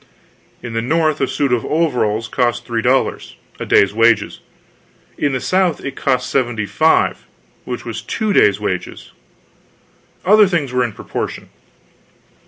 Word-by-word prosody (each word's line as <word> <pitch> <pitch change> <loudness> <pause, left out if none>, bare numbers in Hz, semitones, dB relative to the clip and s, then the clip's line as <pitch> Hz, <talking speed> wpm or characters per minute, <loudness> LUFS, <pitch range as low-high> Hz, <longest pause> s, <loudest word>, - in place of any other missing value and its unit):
In 120 -2 -6
the 115 - -1
North 155 +4 0
a - - +2
suit 140 -3 0
of 120 - 0
overalls 125 -9 0
cost 120 -1 -1
three 115 -2 -2
dollars 130 +3 0 0.2
a - - -5
day's 100 0 +4
wages; 115 +1 +2 0.8
in 145 - -1
the 130 - -1
South 185 +2 0
it 135 -1 -5
cost 125 -2 0
seventy 120 -5 -1
five 155 - +1 0.4
which - - -6
was - - -5
two 215 -2 -2
days' 100 - +4
wages. 95 -4 -5 1.1
Other 210 +2 +6
things 155 -8 -1
were 125 0 +2
in 120 -3 -3
proportion. - - -6
125 Hz, 145 wpm, -18 LUFS, 115-155 Hz, 1.1 s, Other